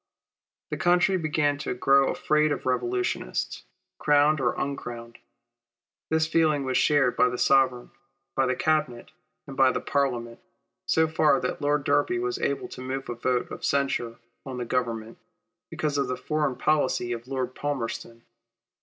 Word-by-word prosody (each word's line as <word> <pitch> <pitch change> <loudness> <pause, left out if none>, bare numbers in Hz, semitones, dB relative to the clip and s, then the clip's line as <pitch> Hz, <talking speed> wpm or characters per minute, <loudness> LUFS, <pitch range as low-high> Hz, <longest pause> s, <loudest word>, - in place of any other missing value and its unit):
The - - -2
country 180 +2 +3
began 150 -4 0
to 145 - -3
grow 135 +2 +4
afraid 150 0 +1
of - - -3
revolutionists, 365 - -2 0.3
crowned 150 0 +3
or" 120 - +1
uncrowned. 120 -4 -5 0.9
This 160 0 +2
feeling 155 -3 +2
was 130 -1 -1
shared 140 -4 +3
by 125 - +4
the 125 - -4
Sovereign, 130 -3 +2 0.4
by 135 -1 +1
the 125 - +1
Cabinet, 135 -4 -1 0.3
and 140 - -9
by 135 -1 +5
the - - -2
Parliament, 125 -5 -1 0.5
so 160 0 +3
far 160 -1 +3
that - - -3
Lord 145 0 +1
Derby 255 - +2
was 380 +2 -2
able 430 -4 -1
to - - -9
move 135 +1 -5
a - - -1
vote 125 +1 -1
of - - -8
censure 135 -5 0 0.3
on 130 -2 -6
the 120 - -3
Government, 115 -2 -3 0.5
because 150 -2 -2
of 140 - 0
the 125 0 -3
foreign 150 0 -1
policy 140 -5 +1
of 120 0 -5
Lord 130 -1 -3
Palmerston. 115 -5 -4
135 Hz, 155 wpm, -26 LUFS, 125-155 Hz, 0.9 s, by